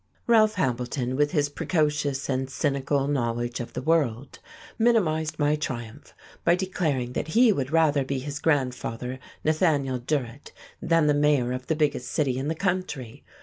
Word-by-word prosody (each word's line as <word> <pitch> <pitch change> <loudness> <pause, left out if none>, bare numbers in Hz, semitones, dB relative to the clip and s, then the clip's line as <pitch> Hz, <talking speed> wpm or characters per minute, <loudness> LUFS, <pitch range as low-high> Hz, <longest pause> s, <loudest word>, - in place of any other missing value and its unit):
Ralph 215 -2 +4
Hambleton, 125 -4 -1
with 145 +1 +2
his 145 -3 +1
precocious 145 -2 -1
and 130 -1 -1
cynical 140 0 0
knowledge 120 -3 -1
of 120 - -6
the - - -4
world, 140 -5 0 0.4
minimized 160 -10 +2
my 150 0 +2
triumph 125 -3 -6 0.3
by 170 - +4
declaring 155 -9 -2
that - - -2
he 230 +7 +5
would 135 -6 -2
rather 155 -4 +3
be 135 +1 -3
his 140 +2 -5
grandfather, 130 -4 -1 0.2
Nathaniel 150 -5 +1
Durrett, 130 0 -3 0.3
than 165 -2 +3
the 150 - +4
mayor 145 -4 +2
of 125 0 -5
the 160 - +1
biggest 150 -2 0
city 135 -5 0
in 135 - -3
the 160 - -1
country. 180 - -3
145 Hz, 155 wpm, -26 LUFS, 130-160 Hz, 0.4 s, he